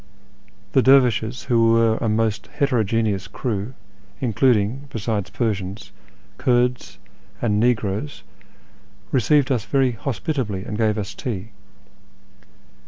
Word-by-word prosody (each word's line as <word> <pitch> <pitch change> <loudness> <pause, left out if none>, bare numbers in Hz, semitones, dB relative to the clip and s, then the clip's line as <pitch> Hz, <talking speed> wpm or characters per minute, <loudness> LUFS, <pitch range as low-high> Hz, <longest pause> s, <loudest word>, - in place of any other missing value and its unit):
The 130 - +4
dervishes, 125 -3 +3
who 115 -2 +3
were 115 -1 +3
a 115 - -1
most 110 -1 0
heterogeneous 115 -7 0
crew, 115 0 -4 0.4
including, 125 +1 +1
besides 110 -4 -3
Persians, 100 -3 -3 0.5
Kurds 125 0 +1 0.4
and 105 -3 +1
negroes, 110 +2 -1 0.9
received 140 +2 +3
us 115 -5 0
very 130 +4 +2
hospitably, 115 -3 -3
and 105 - -5
gave 110 -1 +1
us 105 0 -4
tea. 110 -2 -5
115 Hz, 100 wpm, -22 LUFS, 105-125 Hz, 0.9 s, The